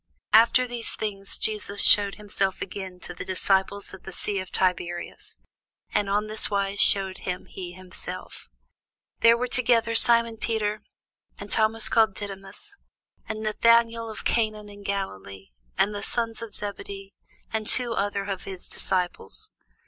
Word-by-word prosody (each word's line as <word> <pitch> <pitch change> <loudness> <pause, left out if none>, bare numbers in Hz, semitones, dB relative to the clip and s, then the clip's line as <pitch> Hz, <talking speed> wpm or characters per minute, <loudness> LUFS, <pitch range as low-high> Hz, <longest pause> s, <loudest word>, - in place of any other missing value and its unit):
After 235 +3 +6
these 240 -2 0
things 200 -2 -4
Jesus 210 -2 -3
shewed 200 -1 +5
himself 200 -2 -1
again 190 -2 -6
to 175 - -6
the - - -6
disciples 190 +1 +1
at 190 - -10
the 190 - -8
sea 200 +2 -2
of 185 -1 -7
Tiberias; 175 -2 -2 0.6
and 200 -1 +1
on 205 +1 +1
this 215 0 +3
wise 200 -1 -1
shewed 195 -1 +3
he 180 0 -6
himself. 185 - -8 0.7
There 230 0 +6
were 250 +1 -1
together 235 -2 +2
Simon 230 0 +5
Peter, 215 -2 -1 0.6
and 200 0 -9
Thomas 220 0 +2
called 220 -4 +3
Didymus, 200 - -9 0.5
and 220 0 -4
Nathanael 230 +1 +3
of 220 - -8
Cana 215 -2 0
in 205 -1 -12
Galilee, 100 - -5 0.3
and 210 - +2
the 205 - -4
sons 230 +2 -3
of 230 -2 -4
Zebedee, 200 -1 -6 0.4
and 220 -1 -2
two 245 -2 +2
other 200 -1 -1
of 195 -2 -5
his 190 -2 -5
disciples. 190 - -2
205 Hz, 145 wpm, -26 LUFS, 195-225 Hz, 0.7 s, After